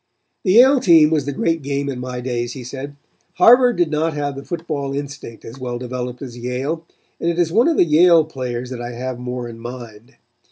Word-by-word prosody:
"The 185 - +2
Yale 260 +5 +7
game 165 -7 +5
was 150 -4 +1
the 145 - -2
great 165 +3 -1
game 140 0 -2
in 135 -3 -4
my 125 0 -5
days," 120 -1 -3
he 130 - -8
said. 135 +3 -7 0.4
"Harvard 245 0 +6
did 175 -3 +1
not 155 +1 0
have 145 -1 -3
the 135 - -8
football 150 -5 -4
instinct 140 -5 -8
as 120 +4 -10
well 125 -1 -4
developed 125 +1 -5
as 125 -3 -8
Yale, 130 +7 -4 0.3
and 170 - 0
it 170 - -2
is 170 -2 +1
of 245 - +3
the - - +5
Yale 165 +1 +5
players 125 -4 -5
that 125 -2 -5
I 120 0 -6
have 125 +1 -5
more 125 0 -5
in 115 -1 -10
mind. 120 0 -10
140 Hz, 210 wpm, -20 LUFS, 125-160 Hz, 0.4 s, Yale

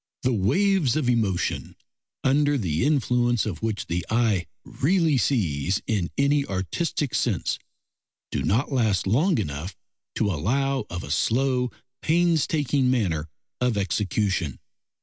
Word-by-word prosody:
The 130 -1 +2
waves 150 - +2
of 155 -5 0
emotion, 110 -7 0 0.5
under 145 +2 +3
the 85 - -1
influence 125 -4 +2
of 105 -6 -4
which 110 -2 -2
the 85 +1 -2
eye 110 -6 +1 0.2
really 165 0 +1
sees 95 - 0
in 100 -6 -1
any 140 +1 +3
artistic 130 - -2
sense, - - 0 0.7
do - - -1
not 125 +9 +1
last 110 -8 +1
long 145 - +2
enough 85 -2 -4 0.4
to 100 - +1
allow 135 - 0
of 90 0 -5
a 70 - -6
slow, 125 - +1 0.3
painstaking 155 -5 +2
manner 85 -11 0 0.3
of 125 -3 +1
execution. 95 - -1
120 Hz, 125 wpm, -25 LUFS, 95-140 Hz, 0.7 s, under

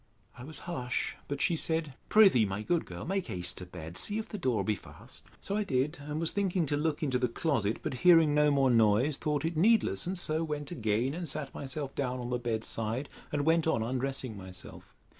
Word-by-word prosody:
I 125 - -10
was 155 +4 -7
hush; 125 -9 -2
but 140 0 -3
she 170 - +2
said, 160 -2 0 0.2
Pr'ythee, 190 - +6
my 95 +2 -3
good 170 +7 0
girl, - - -7
make 190 +1 -1
haste 90 -6 -3
to 90 - -8
bed. 85 -1 -8
See 210 - -2
if 220 0 -3
the 210 - -6
door 125 - +1
be 105 - +1
fast. - - -12 0.2
So 200 - -2
I 210 - +1
did, 145 -1 0
and 150 +2 -4
was 165 0 0
thinking 190 -4 0
to 145 - 0
look 155 +1 -1
into 130 -4 +1
the 125 - +2
closet; 115 -4 0
but, - - -2
hearing 165 -4 +6
no 150 0 +4
more 135 -2 +3
noise, 115 +5 +4
thought 150 -1 -1
it 165 +1 -1
needless, 180 - +3
and 185 +1 -1
so 160 -1 0
went 150 -2 -4
again 115 +4 0
and 170 -1 -4
sat 140 0 -5
myself 140 0 -4
down 130 -2 -2
on 120 0 -5
the 125 - 0
bed 115 -2 -2
side, 115 +6 -2 0.2
and 145 -1 0
went 160 0 +3
on 115 -8 +2
undressing 130 0 -2
myself. 95 -2 -10
140 Hz, 220 wpm, -30 LUFS, 120-160 Hz, 0.2 s, Pr'ythee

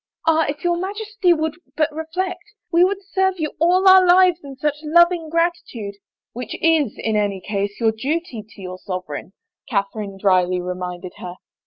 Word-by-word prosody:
" - - -25
Ah, 320 0 +4
if 290 +1 -5
your 345 -1 +1
Majesty 410 0 -1
would 315 -1 0 0.2
but 310 -1 +1
reflect! 335 +4 -3 0.3
We 340 0 +5
would 395 +2 0
serve 380 -1 0
you 305 -2 -1
all 360 +4 +4
our 375 0 +9
lives 360 -1 +5
in 275 -1 -9
such 295 +2 -1
loving 340 +1 +3
gratitude 325 - -2
— - - -73
" - - -72
" - - -72
Which 245 -1 -6
is, 320 -8 +2
in 220 -1 -1
any 205 -2 0
case, 200 +1 -3
your 225 -2 +3
duty 265 +1 -3
to 205 - -14
your 185 0 -7
sovereign," 185 -2 -6 0.4
Catherine 200 -2 -2
dryly 185 -2 +2
reminded 180 0 -5
her. 180 0 -7
305 Hz, 185 wpm, -21 LUFS, -, 0.4 s, our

